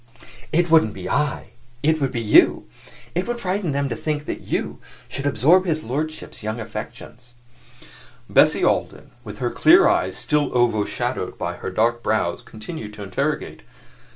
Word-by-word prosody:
"It 170 Hz, +1 st, +1 dB
wouldn't 155 Hz, -10 st, +4 dB
be 90 Hz, -1 st, -6 dB
I 145 Hz, +4 st, -1 dB, 0.3 s
it 155 Hz, +1 st, +2 dB
would 135 Hz, -2 st, 0 dB
be 120 Hz, -3 st, -2 dB
you. 105 Hz, -, +5 dB, 0.5 s
It 180 Hz, +2 st, -2 dB
would 240 Hz, 0 st, -3 dB
frighten 185 Hz, -4 st, -1 dB
them 140 Hz, 0 st, 0 dB
to 115 Hz, -, -2 dB
think 150 Hz, -1 st, -3 dB
that -, -, -5 dB
you -, -, -3 dB, 0.3 s
should 140 Hz, +1 st, -4 dB
absorb 160 Hz, -, +4 dB
his 155 Hz, -2 st, -1 dB
lordship's 155 Hz, +6 st, -4 dB
young 110 Hz, +2 st, -4 dB
affections." 120 Hz, +2 st, -9 dB, 0.9 s
Bessie -, -, +4 dB
Alden, -, -, -1 dB
with -, -, -9 dB
her -, -, -2 dB
clear -, -, +6 dB
eyes 95 Hz, 0 st, +1 dB
still 150 Hz, -1 st, +1 dB
overshadowed 115 Hz, -4 st, -1 dB
by -, -, -3 dB
her -, -, -5 dB
dark 115 Hz, +5 st, +1 dB
brows, 110 Hz, -7 st, 0 dB
continued 110 Hz, -1 st, -8 dB
to 105 Hz, -, -8 dB
interrogate. 95 Hz, -2 st, -3 dB
130 Hz, 155 wpm, -22 LUFS, 110-155 Hz, 0.9 s, clear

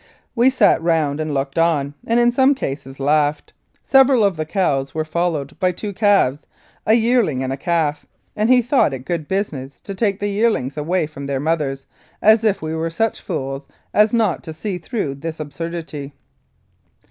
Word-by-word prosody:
We 245 Hz, +1 st, +4 dB
sat 230 Hz, -10 st, +3 dB
round 160 Hz, -3 st, +1 dB
and 155 Hz, -1 st, -2 dB
looked 135 Hz, +2 st, -2 dB
on, 150 Hz, -4 st, +1 dB
and, 230 Hz, +1 st, +3 dB
in 240 Hz, 0 st, +4 dB
some 265 Hz, +3 st, +4 dB
cases, 135 Hz, -, -6 dB
laughed. 150 Hz, +1 st, +1 dB, 0.3 s
Several 270 Hz, -3 st, +5 dB
of 200 Hz, -3 st, +2 dB
the 155 Hz, -1 st, -4 dB
cows 140 Hz, -8 st, 0 dB
were 155 Hz, 0 st, -1 dB
followed 155 Hz, -3 st, -2 dB
by 185 Hz, -1 st, +2 dB
two 200 Hz, +3 st, -6 dB
calves 195 Hz, -, +2 dB, 0.4 s
a 220 Hz, -, +6 dB
yearling 225 Hz, -, +2 dB
and 130 Hz, 0 st, -2 dB
a -, -, -2 dB
calf, 155 Hz, -1 st, -1 dB, 0.3 s
and 215 Hz, +2 st, +1 dB
he 250 Hz, -1 st, +5 dB
thought 245 Hz, -, +2 dB
it 130 Hz, 0 st, -10 dB
good 170 Hz, -4 st, -3 dB
business 145 Hz, -9 st, -3 dB
to 200 Hz, -, -6 dB
take 200 Hz, -1 st, 0 dB
the 205 Hz, -, -1 dB
yearlings 200 Hz, -, 0 dB
away 160 Hz, +3 st, 0 dB
from 145 Hz, -2 st, -9 dB
their 140 Hz, -1 st, -1 dB
mothers, 145 Hz, -3 st, -1 dB, 0.3 s
as 220 Hz, +1 st, +5 dB
if 205 Hz, -6 st, +1 dB
we 155 Hz, 0 st, -3 dB
were 160 Hz, +1 st, -2 dB
such 225 Hz, +7 st, -1 dB
fools 135 Hz, -5 st, -4 dB, 0.3 s
as 210 Hz, 0 st, +4 dB
not 220 Hz, -7 st, +1 dB
to 160 Hz, -, -6 dB
see 180 Hz, +3 st, -4 dB
through 165 Hz, -, -3 dB
this 160 Hz, +3 st, -6 dB
absurdity. 155 Hz, -2 st, -6 dB
165 Hz, 180 wpm, -20 LUFS, 145-210 Hz, 0.4 s, a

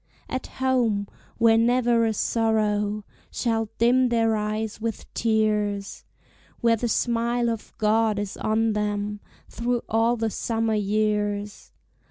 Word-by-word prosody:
At 260 Hz, -, -4 dB
home, 240 Hz, -6 st, 0 dB, 0.3 s
where 225 Hz, -1 st, +5 dB
never 240 Hz, 0 st, +3 dB
a 220 Hz, -, +1 dB
sorrow 210 Hz, -2 st, 0 dB, 0.3 s
Shall 225 Hz, -2 st, -1 dB
dim 250 Hz, +2 st, +4 dB
their 225 Hz, -2 st, +2 dB
eyes 215 Hz, 0 st, -3 dB
with 225 Hz, -2 st, -3 dB
tears! 210 Hz, -3 st, 0 dB, 0.5 s
Where 230 Hz, -1 st, +3 dB
the 235 Hz, +1 st, -2 dB
smile 235 Hz, +1 st, +1 dB
of 225 Hz, -2 st, -6 dB
God 215 Hz, 0 st, +2 dB
is 205 Hz, -1 st, -3 dB
on 220 Hz, 0 st, +1 dB
them 210 Hz, 0 st, -2 dB, 0.3 s
Through 240 Hz, 0 st, -2 dB
all 225 Hz, +2 st, +2 dB
the 225 Hz, -1 st, -1 dB
summer 225 Hz, 0 st, -1 dB
years! 210 Hz, 0 st, -1 dB
220 Hz, 125 wpm, -25 LUFS, 210-230 Hz, 0.5 s, where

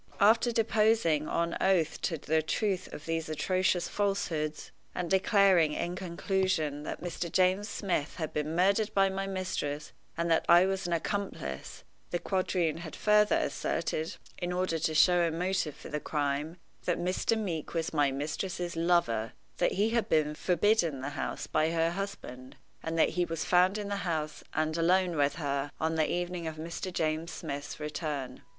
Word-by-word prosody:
After 225 Hz, +4 st, +5 dB
deposing 215 Hz, -8 st, +2 dB
on 170 Hz, 0 st, 0 dB
oath 185 Hz, -4 st, +2 dB
to 165 Hz, -, -1 dB
the 155 Hz, +2 st, +1 dB
truth 190 Hz, +3 st, -1 dB
of 145 Hz, -, -9 dB
these 165 Hz, -1 st, -2 dB
atrocious 185 Hz, +2 st, +1 dB
falsehoods, 170 Hz, -7 st, -2 dB, 0.2 s
and 180 Hz, 0 st, -3 dB
declaring, 190 Hz, -4 st, +4 dB
in 175 Hz, +3 st, -2 dB
conclusion, 180 Hz, -4 st, -1 dB
that 150 Hz, -, -6 dB
Mr. 175 Hz, -1 st, -4 dB
James 185 Hz, +4 st, +2 dB
Smith 180 Hz, -8 st, -2 dB
had 160 Hz, -3 st, -4 dB
been 150 Hz, +1 st, -2 dB
murdered 200 Hz, +4 st, +3 dB
by 195 Hz, -1 st, +4 dB
my 195 Hz, +1 st, -3 dB
mistress, 165 Hz, -6 st, -3 dB, 0.3 s
and 170 Hz, 0 st, 0 dB
that 165 Hz, -, +4 dB
I 175 Hz, +2 st, +8 dB
was 190 Hz, -1 st, -1 dB
an 175 Hz, -, -1 dB
accomplice, 165 Hz, -, -3 dB, 0.3 s
the 175 Hz, -, 0 dB
quadroon 180 Hz, -4 st, 0 dB
had 165 Hz, -2 st, -7 dB
further 210 Hz, 0 st, +4 dB
asserted, 160 Hz, +1 st, -1 dB, 0.2 s
in 175 Hz, 0 st, -2 dB
order 180 Hz, -2 st, 0 dB
to 155 Hz, 0 st, 0 dB
show 175 Hz, +3 st, +5 dB
a 170 Hz, -, +2 dB
motive 170 Hz, -2 st, -1 dB
for -, -, -11 dB
the 150 Hz, -, -2 dB
crime, 150 Hz, +2 st, -2 dB, 0.3 s
that 175 Hz, -, +1 dB
Mr. 185 Hz, +5 st, 0 dB
Meeke 175 Hz, -7 st, -3 dB
was 165 Hz, -1 st, -1 dB
my 145 Hz, -2 st, +3 dB
mistress's 170 Hz, +5 st, -3 dB
lover; 165 Hz, -10 st, +1 dB, 0.2 s
that -, -, +2 dB
he 210 Hz, +3 st, +1 dB
had 230 Hz, -1 st, 0 dB
been 150 Hz, -1 st, +2 dB
forbidden 175 Hz, -4 st, +1 dB
the 135 Hz, -, -3 dB
house 145 Hz, -, -4 dB
by 155 Hz, +1 st, +1 dB
her 165 Hz, 0 st, +1 dB
husband, 170 Hz, -10 st, -6 dB, 0.3 s
and 165 Hz, 0 st, -3 dB
that -, -, +4 dB
he 180 Hz, -, 0 dB
was 165 Hz, -2 st, -3 dB
found 180 Hz, +3 st, +4 dB
in 205 Hz, -1 st, -4 dB
the 200 Hz, -, -1 dB
house, 160 Hz, -5 st, -3 dB
and 155 Hz, +1 st, 0 dB
alone 180 Hz, +1 st, +3 dB
with 145 Hz, -1 st, +2 dB
her, 140 Hz, -2 st, -2 dB
on 160 Hz, +1 st, 0 dB
the 160 Hz, -1 st, +1 dB
evening 175 Hz, -1 st, -2 dB
of 160 Hz, -, -4 dB
Mr. 170 Hz, +4 st, -5 dB
James 160 Hz, -1 st, -1 dB
Smith's 145 Hz, -2 st, -6 dB
return. 150 Hz, -3 st, -4 dB
170 Hz, 170 wpm, -30 LUFS, 155-190 Hz, 0.3 s, I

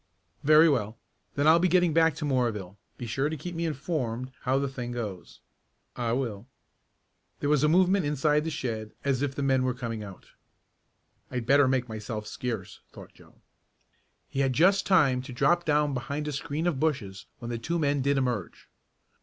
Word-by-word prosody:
"Very 155 Hz, +2 st, +7 dB
well, 115 Hz, -7 st, 0 dB, 0.4 s
then 145 Hz, -, +1 dB
I'll 160 Hz, +2 st, +7 dB
be 180 Hz, -, +3 dB
getting 175 Hz, -2 st, +3 dB
back 160 Hz, -1 st, +4 dB
to 150 Hz, -, -4 dB
Moorville. 115 Hz, -9 st, -1 dB, 0.2 s
Be 120 Hz, -, -6 dB
sure 135 Hz, +6 st, -1 dB
to 160 Hz, -, -4 dB
keep 175 Hz, +5 st, -6 dB
me 165 Hz, 0 st, -2 dB
informed 130 Hz, -5 st, -3 dB
how 130 Hz, +1 st, +2 dB
the 140 Hz, 0 st, 0 dB
thing 125 Hz, -2 st, -5 dB
goes." 100 Hz, -8 st, -6 dB, 0.5 s
"I 120 Hz, -2 st, -2 dB
will." 120 Hz, -4 st, -3 dB, 0.9 s
There 145 Hz, -, 0 dB
was 150 Hz, -1 st, +3 dB
a -, -, +5 dB
movement 185 Hz, +3 st, +4 dB
inside 150 Hz, +1 st, +2 dB
the 160 Hz, -, -2 dB
shed 115 Hz, -8 st, -4 dB
as 135 Hz, -2 st, +1 dB
if 140 Hz, -2 st, -1 dB
the 140 Hz, -, -2 dB
men 135 Hz, -1 st, +2 dB
were 130 Hz, -1 st, 0 dB
coming 115 Hz, -4 st, -5 dB
out. 95 Hz, -3 st, -12 dB, 1.0 s
"I'd 125 Hz, -2 st, -4 dB
better 140 Hz, +2 st, +5 dB
make 130 Hz, -1 st, +1 dB
myself 110 Hz, -1 st, -5 dB
scarce," 110 Hz, -3 st, -5 dB
thought -, -, -13 dB
Joe. -, -, -20 dB, 0.9 s
He 135 Hz, -, -5 dB
had 135 Hz, -1 st, +2 dB
just 190 Hz, +8 st, +3 dB
time 145 Hz, -10 st, +4 dB
to 130 Hz, +1 st, -9 dB
drop 175 Hz, +7 st, +2 dB
down 150 Hz, -1 st, +2 dB
behind 140 Hz, +4 st, -3 dB
a -, -, -2 dB
screen 150 Hz, +3 st, -3 dB
of 165 Hz, -7 st, 0 dB
bushes 125 Hz, -12 st, -2 dB
when 120 Hz, 0 st, -6 dB
the 115 Hz, -, -3 dB
two 170 Hz, +9 st, -2 dB
men 145 Hz, -3 st, +1 dB
did 140 Hz, +1 st, +1 dB
emerge. 125 Hz, -9 st, -3 dB
135 Hz, 185 wpm, -27 LUFS, 120-150 Hz, 1.0 s, Very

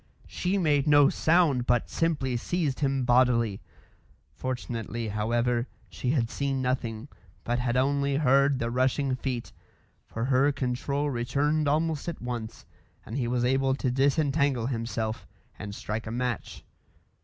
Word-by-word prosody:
She 185 Hz, +2 st, -1 dB
made 150 Hz, -5 st, +2 dB
no 145 Hz, -1 st, +6 dB
sound, 155 Hz, -7 st, +2 dB
but 120 Hz, -2 st, +2 dB
simply 150 Hz, -6 st, -1 dB
seized 145 Hz, +2 st, -1 dB
him 135 Hz, -3 st, 0 dB
bodily. 120 Hz, -4 st, +3 dB, 0.7 s
Fortunately, 115 Hz, -, -4 dB
however, 120 Hz, +3 st, 0 dB, 0.2 s
she 125 Hz, -, -4 dB
had 125 Hz, -5 st, +1 dB
seen 140 Hz, -1 st, -1 dB
nothing, 125 Hz, -2 st, -2 dB, 0.4 s
but 120 Hz, +1 st, -1 dB
had 120 Hz, 0 st, 0 dB
only 140 Hz, +1 st, +1 dB
heard 140 Hz, -1 st, +3 dB
the 115 Hz, -1 st, -2 dB
rushing 130 Hz, +2 st, +1 dB
feet, 125 Hz, -2 st, -4 dB, 0.6 s
for 115 Hz, +2 st, -3 dB
her 135 Hz, +2 st, +3 dB
control 140 Hz, +2 st, -2 dB
returned 145 Hz, +5 st, 0 dB
almost 155 Hz, +2 st, 0 dB
at 170 Hz, -, -6 dB
once, 120 Hz, -2 st, -6 dB, 0.4 s
and 110 Hz, -, -7 dB
he 130 Hz, -4 st, -1 dB
was 120 Hz, 0 st, 0 dB
able 135 Hz, +1 st, +2 dB
to 130 Hz, -2 st, -1 dB
disentangle 140 Hz, -1 st, +1 dB
himself 115 Hz, -2 st, -3 dB, 0.3 s
and 100 Hz, -1 st, -6 dB
strike 110 Hz, +2 st, -4 dB
a -, -, -4 dB
match. 125 Hz, 0 st, -3 dB
130 Hz, 140 wpm, -27 LUFS, 120-140 Hz, 0.7 s, no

